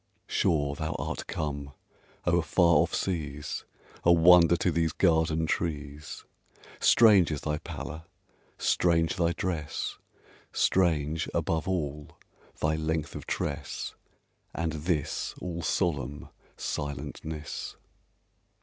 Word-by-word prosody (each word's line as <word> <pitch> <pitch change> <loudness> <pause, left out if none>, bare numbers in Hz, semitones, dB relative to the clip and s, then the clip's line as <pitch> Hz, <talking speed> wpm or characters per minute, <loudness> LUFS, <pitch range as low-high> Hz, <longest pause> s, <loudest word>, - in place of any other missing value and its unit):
Sure 70 -3 +1
thou 80 +2 -3
art - - -4
come 70 -2 -4 0.5
o'er 85 0 +3
far 85 0 +4
off 85 +3 +2
seas, 75 -5 -3 0.4
A 85 - +6
wonder 85 0 +7
to 90 - +1
these 80 -1 +1
garden 80 -2 +2
trees! 75 -3 -3 0.5
Strange 105 -7 +6
is 75 -3 -3
thy 75 0 -2
pallor! 80 +2 -7 0.5
strange 85 -2 +2
thy 85 -1 +2
dress! 85 -4 -3 0.5
Strange, 80 -4 +1
above 80 0 0
all, 75 -5 -3 0.4
thy 80 0 +1
length 80 -1 -2
of - - -7
tress, 70 - -3 0.6
And 85 -1 -1
this 80 -1 -2
all 85 -1 -4
solemn 75 -5 -1 0.3
silentness! 75 +1 -5
80 Hz, 105 wpm, -28 LUFS, 75-85 Hz, 0.6 s, wonder